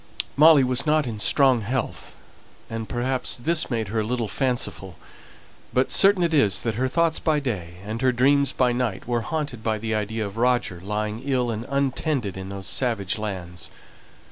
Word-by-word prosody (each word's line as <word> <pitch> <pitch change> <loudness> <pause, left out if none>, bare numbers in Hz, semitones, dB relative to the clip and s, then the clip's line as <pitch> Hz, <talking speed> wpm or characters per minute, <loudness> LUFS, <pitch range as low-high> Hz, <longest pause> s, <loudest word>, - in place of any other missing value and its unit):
Molly 150 -1 +7
was 130 +4 0
not 155 -1 +3
in 110 -4 -5
strong 130 +4 +3
health, 120 +4 -4 0.6
and 115 -1 -5
perhaps 130 +2 -1
this 160 +7 +1
made 115 -5 -2
her 110 +2 -1
a - - 0
little 115 +1 -2
fanciful; 115 - -2 0.8
but 130 +1 +1
certain 195 -2 +5
it 170 -1 0
is 105 -11 +3
that 115 - -1
her 125 +5 0
thoughts 165 +3 +1
by 155 -2 +1
day 95 -11 -4
and 110 +2 -4
her 130 -1 +3
dreams 140 +3 +3
by 125 -1 +1
night 120 -6 -2
were 120 -1 0
haunted 145 -4 -4
by 110 -1 0
the 110 +1 -3
idea 110 +1 -2
of 100 +2 -8
Roger 120 -7 0
lying 105 +2 -3
ill 130 -3 0
and 110 +1 -5
untended 140 - -1
in 95 0 -7
those 100 -1 -7
savage 110 -6 -1
lands. 90 -5 -6
120 Hz, 180 wpm, -24 LUFS, 105-135 Hz, 0.8 s, Molly